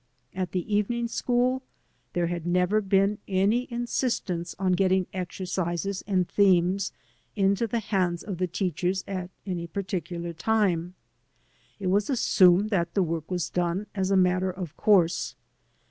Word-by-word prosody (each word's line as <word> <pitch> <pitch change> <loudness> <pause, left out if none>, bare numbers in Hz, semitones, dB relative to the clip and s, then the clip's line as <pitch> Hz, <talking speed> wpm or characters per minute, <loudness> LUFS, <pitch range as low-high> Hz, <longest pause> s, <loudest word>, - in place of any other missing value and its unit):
At 185 -1 -3
the 190 +3 -1
evening 235 +3 0
school 250 +2 +1 0.5
there 175 -1 +1
had 170 -1 -3
never 180 +4 +2
been 195 +1 +2
any 205 +7 +1
insistence 235 -8 -2
on 190 -1 +1
getting 185 0 +2
exercises 185 0 -3
and 185 -3 +1
themes 190 -1 +3 0.4
into 200 +2 +2
the 235 - -1
hands 185 -5 0
of 195 -4 -5
the 185 - +1
teachers 180 +1 -1
at 185 -2 -4 0.2
any 175 -3 -3
particular 175 -2 -4
time. 180 -3 0 0.8
It 200 - -6
was 205 +4 +2
assumed 200 -5 +4
that 170 -4 0
the 195 - +4
work 165 -2 -3
was 180 -3 -2
done, 180 +3 -1
as 190 -2 -1
a 195 - +3
matter 185 0 +3
of 180 -4 -6
course. 180 -5 +2
185 Hz, 145 wpm, -27 LUFS, 175-205 Hz, 0.8 s, assumed